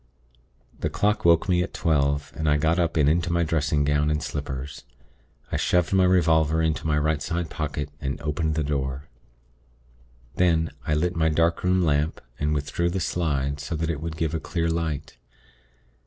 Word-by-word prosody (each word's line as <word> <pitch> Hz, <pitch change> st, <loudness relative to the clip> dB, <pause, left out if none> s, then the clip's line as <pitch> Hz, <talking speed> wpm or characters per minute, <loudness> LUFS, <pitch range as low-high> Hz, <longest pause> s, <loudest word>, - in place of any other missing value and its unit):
"The 80 Hz, -, -1 dB
clock 100 Hz, +7 st, 0 dB
woke 85 Hz, +3 st, +5 dB
me 90 Hz, -2 st, +3 dB
at 90 Hz, -, -4 dB
twelve, 70 Hz, -3 st, 0 dB
and 80 Hz, -1 st, 0 dB
I 75 Hz, -, +4 dB
got 80 Hz, +4 st, +1 dB
up 85 Hz, -2 st, 0 dB
and 75 Hz, -2 st, +4 dB
into 85 Hz, +2 st, +2 dB
my 85 Hz, 0 st, +2 dB
dressing 75 Hz, -2 st, +1 dB
gown 75 Hz, +1 st, +2 dB
and 75 Hz, 0 st, -1 dB
slippers. 70 Hz, -1 st, -5 dB, 0.7 s
I -, -, 0 dB
shoved 90 Hz, +1 st, +1 dB
my 95 Hz, -1 st, +5 dB
revolver 80 Hz, -3 st, +3 dB
into 80 Hz, -1 st, 0 dB
my 75 Hz, -1 st, +2 dB
right 75 Hz, 0 st, +1 dB
side 85 Hz, +1 st, -3 dB
pocket, 75 Hz, -2 st, -3 dB
and 70 Hz, +1 st, -3 dB
opened 75 Hz, +1 st, -1 dB
my 80 Hz, -, +1 dB
door. 70 Hz, -1 st, -3 dB, 1.3 s
Then, 80 Hz, -3 st, +2 dB, 0.2 s
I 75 Hz, -, +2 dB
lit 90 Hz, +3 st, 0 dB
my 80 Hz, -1 st, +2 dB
darkroom 85 Hz, +3 st, +2 dB
lamp, 75 Hz, 0 st, +1 dB, 0.2 s
and 75 Hz, +1 st, 0 dB
withdrew 75 Hz, +4 st, -1 dB
the 95 Hz, +2 st, -2 dB
slide, 75 Hz, -5 st, -1 dB
so 75 Hz, +3 st, -4 dB
that 80 Hz, +1 st, -1 dB
it 75 Hz, -3 st, -5 dB
would 80 Hz, -1 st, -5 dB
give 80 Hz, -1 st, -1 dB
a 80 Hz, -, -1 dB
clear 85 Hz, 0 st, -1 dB
light. 75 Hz, -3 st, -3 dB
80 Hz, 180 wpm, -25 LUFS, 75-85 Hz, 1.3 s, woke